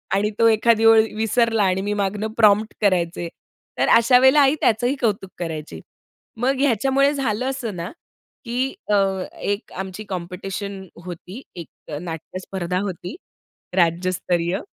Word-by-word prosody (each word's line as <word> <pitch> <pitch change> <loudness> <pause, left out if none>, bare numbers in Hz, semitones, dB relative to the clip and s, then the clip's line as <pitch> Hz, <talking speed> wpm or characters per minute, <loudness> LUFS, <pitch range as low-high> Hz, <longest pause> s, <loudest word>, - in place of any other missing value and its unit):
आणि 205 +2 +1
तो 230 - +6
एखादी 225 0 +3
ओळ 225 0 +8
विसरला, 225 0 +2
आणि 190 0 +1
मी 205 +1 -2
मागनं 205 +1 -1
प्रॉम्प्ट 215 -1 +4
करायचे, 175 -4 +1 0.5
तर - - +3
अशा 240 +2 +6
वेळेला 265 +3 +6
आई 275 +1 +4
त्याचंही 245 +4 +2
कौतुक 205 -5 0
करायची. 160 -3 -5 0.6
मग 255 +4 +1
ह्याच्यामुळे 275 +2 +2
झालं 255 -4 -1
असं 250 -6 -4
ना, 170 +3 -5 0.5
की 250 +3 -1 0.2
अ, - - +5 0.4
एक 205 +2 -3
आमची 190 +2 -6
कॉम्पिटिशन 190 +2 -5 0.2
होती, 180 +6 -8
एक 170 -2 -11
नाट्य 165 +1 -7
स्पर्धा 185 -1 -3
होती 185 -1 -5 0.6
राज्यस्तरीय. 175 0 +1
205 Hz, 135 wpm, -22 LUFS, 180-230 Hz, 0.6 s, ओळ